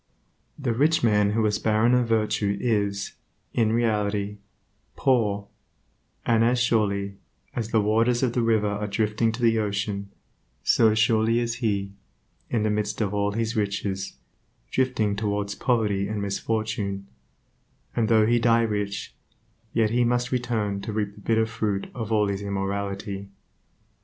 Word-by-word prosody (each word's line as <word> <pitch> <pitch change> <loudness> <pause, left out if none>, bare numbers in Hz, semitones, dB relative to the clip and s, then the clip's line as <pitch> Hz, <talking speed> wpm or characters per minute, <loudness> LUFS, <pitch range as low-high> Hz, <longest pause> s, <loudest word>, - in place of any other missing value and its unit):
The 130 -5 -1
rich 150 +6 +2
man 105 -2 +3
who 110 0 +2
is 105 -1 +1
barren 110 +2 +3
of 125 -1 +3
virtue 105 -2 +1
is, 100 -4 0 0.4
in 110 -2 +2
reality, 105 -3 0 0.6
poor, 105 -6 +1 0.8
and 115 -1 +3
as 120 +2 +3
surely, 100 -5 +1 0.4
as 115 -3 -2
the 110 -2 +3
waters 115 +4 +2
of 120 -3 +1
the 120 - +1
river 110 -2 +2
are 105 +1 -2
drifting 110 +2 +1
to 120 +1 -5
the 115 -1 +4
ocean, 100 -1 -2 0.5
so 110 - +4
surely 110 +1 +3
is 120 0 -1
he, 100 -5 -1 0.6
in 115 -3 0
the 110 - +1
midst 105 0 -1
of 105 -3 0
all 100 0 0
his 115 +1 -1
riches, 100 -2 -2 0.6
drifting 115 -6 +1
towards 105 -1 -1
poverty 105 -6 +1
and 105 0 -3
misfortune; 100 0 -2 0.9
and 115 -2 +1
though 110 -2 +5
he 120 +2 +3
die 115 0 +4
rich, 105 -2 -2 0.6
yet 110 -1 +1
must 125 +1 +1
he 130 - 0
return 110 -5 -2
to 110 +3 -5
reap 105 -1 -2
the 105 - -15
bitter 110 +1 +2
fruit 110 -3 -2
of 115 -3 -5
all 105 -1 +3
of 100 - 0
his 100 0 -3
immorality. 100 0 -3
110 Hz, 150 wpm, -25 LUFS, 100-115 Hz, 0.9 s, though